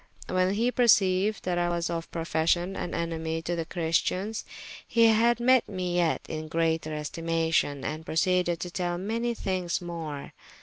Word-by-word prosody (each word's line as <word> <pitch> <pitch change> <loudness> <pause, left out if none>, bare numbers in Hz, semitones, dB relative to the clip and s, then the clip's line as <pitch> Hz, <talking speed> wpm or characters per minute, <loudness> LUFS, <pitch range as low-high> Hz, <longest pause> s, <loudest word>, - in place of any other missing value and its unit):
When 185 +1 +1
he 235 +4 +1
perceyued 210 -4 +3
that 175 -1 0
I 175 0 +1
was 170 -1 -1
of 165 -1 -4
profession 170 +3 0
an 175 - -4
enemy 165 -1 -2
to 175 - -2
the 165 -1 -2
Christians, 180 +6 -1 0.4
he 230 -1 +4
had 230 +1 +4
me 255 +1 +5 0.3
yet 170 -2 +2
in 155 0 -5
greater 160 0 0
estimation, 160 -2 -1
and 155 +1 -4
proceeded 175 +1 +1
to 180 - -4
tell 175 -1 -2
me 185 - -6
many 235 +1 -1
thynges 185 -4 -1
more. 165 -5 -6
175 Hz, 160 wpm, -27 LUFS, 165-190 Hz, 0.4 s, me